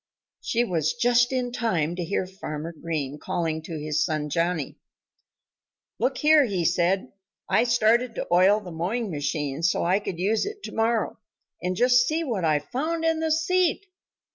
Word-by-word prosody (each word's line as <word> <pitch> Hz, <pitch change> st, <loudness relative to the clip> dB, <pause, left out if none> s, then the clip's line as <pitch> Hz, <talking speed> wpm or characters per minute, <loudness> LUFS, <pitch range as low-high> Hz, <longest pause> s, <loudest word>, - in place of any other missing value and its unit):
She 235 Hz, +1 st, 0 dB
was 165 Hz, -9 st, 0 dB
just 245 Hz, +1 st, +3 dB
in 250 Hz, -2 st, -1 dB
time 175 Hz, -10 st, -1 dB
to 180 Hz, -, -3 dB
hear 185 Hz, +2 st, -1 dB
Farmer 170 Hz, -4 st, -6 dB
Green 150 Hz, -3 st, -4 dB
calling 160 Hz, -1 st, -2 dB
to 160 Hz, 0 st, -6 dB
his 150 Hz, 0 st, 0 dB
son 150 Hz, -2 st, -2 dB
Johnnie. 170 Hz, -3 st, -1 dB, 1.2 s
"Look 255 Hz, +4 st, 0 dB
here!" 300 Hz, -2 st, +5 dB, 0.2 s
said 180 Hz, +4 st, +2 dB
he. -, -, -15 dB, 0.4 s
"I 235 Hz, -, +3 dB
started 235 Hz, 0 st, +2 dB
to -, -, -3 dB
oil 190 Hz, +4 st, +5 dB
the 185 Hz, -4 st, -10 dB
mowing 195 Hz, +7 st, -2 dB
machine 145 Hz, -1 st, -2 dB
so 170 Hz, 0 st, +1 dB
I 185 Hz, +3 st, +3 dB
could 190 Hz, -4 st, -5 dB
use 205 Hz, +5 st, +1 dB
it 415 Hz, -1 st, -7 dB
to -, -, -6 dB
morrow; 225 Hz, 0 st, 0 dB, 0.4 s
and 180 Hz, +1 st, -1 dB
just 245 Hz, +3 st, +4 dB
see 320 Hz, +2 st, 0 dB
what 230 Hz, -, -2 dB
I 155 Hz, -2 st, +3 dB
found 315 Hz, -, -3 dB
in 325 Hz, -1 st, +2 dB
the 320 Hz, 0 st, 0 dB
seat!" 360 Hz, +4 st, +1 dB
195 Hz, 170 wpm, -25 LUFS, 165-245 Hz, 1.2 s, here